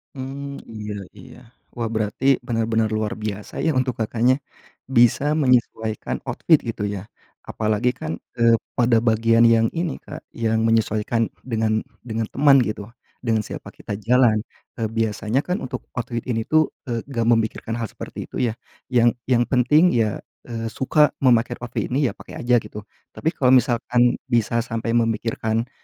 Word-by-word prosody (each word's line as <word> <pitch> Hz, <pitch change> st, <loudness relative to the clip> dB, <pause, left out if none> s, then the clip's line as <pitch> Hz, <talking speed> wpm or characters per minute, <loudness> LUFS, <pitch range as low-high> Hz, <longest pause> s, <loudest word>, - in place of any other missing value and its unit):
Mmm, 140 Hz, +1 st, -6 dB
iya 105 Hz, -2 st, -6 dB, 0.2 s
iya. -, -, -13 dB, 0.4 s
Wah, 115 Hz, -, -1 dB
berarti 110 Hz, +3 st, -2 dB, 0.2 s
benar-benar 115 Hz, -1 st, 0 dB
luar 110 Hz, -1 st, -1 dB
biasa, 105 Hz, -1 st, -5 dB
ya, 160 Hz, -5 st, +1 dB
untuk 130 Hz, -1 st, +1 dB
Kakaknya, 120 Hz, +5 st, +2 dB, 0.5 s
bisa 135 Hz, +5 st, +3 dB
menyesuaikan 120 Hz, -5 st, +1 dB
outfit, 160 Hz, -, +3 dB
gitu, 115 Hz, -2 st, -4 dB
ya. 100 Hz, -1 st, -5 dB, 0.4 s
Apalagi, 110 Hz, +3 st, 0 dB
kan, 80 Hz, +2 st, -5 dB, 0.2 s
eee, 115 Hz, -1 st, +4 dB, 0.2 s
pada 120 Hz, -1 st, +3 dB
bagian 115 Hz, +1 st, +4 dB
yang 115 Hz, -1 st, +4 dB
ini, 170 Hz, -3 st, -3 dB
Kak, -, -, -10 dB
yang 110 Hz, -1 st, 0 dB
menyesuaikan 115 Hz, 0 st, +1 dB, 0.2 s
dengan 110 Hz, -2 st, 0 dB, 0.2 s
dengan 115 Hz, -2 st, -3 dB
teman, 140 Hz, +4 st, +4 dB
gitu, 105 Hz, 0 st, -5 dB, 0.3 s
dengan 110 Hz, -3 st, 0 dB
siapa -, -, -7 dB
kita -, -, -7 dB
jalan. 120 Hz, -2 st, +4 dB, 0.4 s
Eee, 110 Hz, -, 0 dB
biasanya, 115 Hz, +3 st, -1 dB
kan, 180 Hz, +3 st, -2 dB
untuk 125 Hz, -, -5 dB
outfit 120 Hz, -1 st, -4 dB
ini, 115 Hz, -3 st, -1 dB
tuh, 155 Hz, +6 st, +2 dB, 0.2 s
eee, 115 Hz, -1 st, -2 dB
enggak 120 Hz, -5 st, -2 dB
memikirkan 115 Hz, +1 st, -3 dB
hal 115 Hz, -, -2 dB
seperti -, -, -8 dB
itu, -, -, -5 dB
ya? 110 Hz, -, -6 dB, 0.3 s
Yang 120 Hz, -2 st, +4 dB, 0.2 s
yang 120 Hz, -1 st, +3 dB
penting, 145 Hz, +8 st, +4 dB
ya, 110 Hz, -3 st, +1 dB, 0.3 s
eee, 115 Hz, -1 st, -4 dB
suka 150 Hz, +2 st, +3 dB
memakai 120 Hz, -2 st, +3 dB
outfit 120 Hz, 0 st, -3 dB
ini, 135 Hz, 0 st, +1 dB
ya, -, -, -10 dB
pakai -, -, -12 dB
aja, 120 Hz, 0 st, +4 dB
gitu. 105 Hz, -1 st, -5 dB, 0.3 s
Tapi, 160 Hz, -, -1 dB
kalau 130 Hz, -6 st, +2 dB
misalkan 120 Hz, -1 st, +3 dB
bisa 120 Hz, -2 st, +1 dB
sampai 115 Hz, 0 st, -3 dB
memikirkan 115 Hz, 0 st, -1 dB
115 Hz, 155 wpm, -22 LUFS, 110-125 Hz, 0.5 s, eee